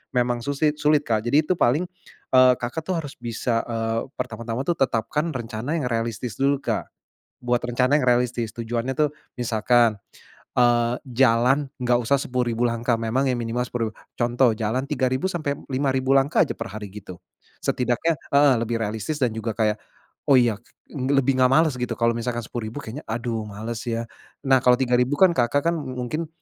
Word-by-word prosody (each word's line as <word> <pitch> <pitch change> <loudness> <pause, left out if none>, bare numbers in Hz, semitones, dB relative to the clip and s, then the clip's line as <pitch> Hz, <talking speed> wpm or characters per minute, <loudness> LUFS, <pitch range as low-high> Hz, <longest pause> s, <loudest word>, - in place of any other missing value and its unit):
memang 120 -1 +1
susi 145 +4 0
sulit, 150 0 +3
Kak. 110 -4 +1
Jadi 145 +6 +4
itu 180 +2 -1
paling, 135 +8 +3 0.5
eee, 130 -1 +7
Kakak 120 +6 -4
tuh 185 - 0
harus 145 -4 -6
bisa, 115 0 -1
eee, 115 -1 -2
pertama-tama 115 +2 -4
tuh 170 +3 -1
tetapkan 135 +5 0
rencana 120 +4 -3
yang 130 -7 -2
realistis 115 -1 -3
dulu, 140 0 +2
Kak. - - -2 0.6
Buat 120 0 +1
rencana 125 +3 +2
yang 130 - -1
realistis. 120 -2 +1
Tujuannya 120 +2 -2
tuh 150 -1 +3 0.3
misalkan, 115 -1 +2 0.6
eee, 120 -1 +3
jalan 130 +3 +3
enggak 120 -1 +2
usah 140 +5 +3
10.000 120 -3 -1
langkah, 115 +1 0
memang 120 +4 0
yang 125 - -1
minimal 120 +1 -1
10.000, 115 -3 -4 0.2
contoh 120 +1 +3
jalan 115 +4 -1
3.000 130 +2 0
sampai 150 -5 -2 0.2
5.000 130 0 0
langkah 135 +1 +4
aja - - -4
per - - -4
hari 105 0 -7
gitu. 95 -2 -9 0.5
Setidaknya 125 +6 0 0.2
heeh, 140 -1 +6
lebih 115 0 -1
realistis 110 +9 -3
dan 120 - +2
juga 110 0 -3
kayak, 105 -1 +1 0.5
"Oh 140 - +7
iya 120 -4 +2 0.3
nge 135 -1 -2
lebih 135 -1 +2
enggak 130 - +6
males," 155 -2 +3
gitu 125 -1 -2
kalo 115 0 +3
misalkan 120 0 -2
10.000 115 +3 -5
kayaknya, 125 +8 -7
"Aduh 115 -1 -3
males 110 +3 -5
ya." 115 0 -1 0.4
Nah 135 -1 +5
kalo 125 0 +6
3.000 125 +1 +2
kan 190 -2 +7
Kakak 135 +6 +2
kan - - -2
mungkin 130 +4 -4
125 Hz, 175 wpm, -23 LUFS, 115-135 Hz, 0.6 s, eee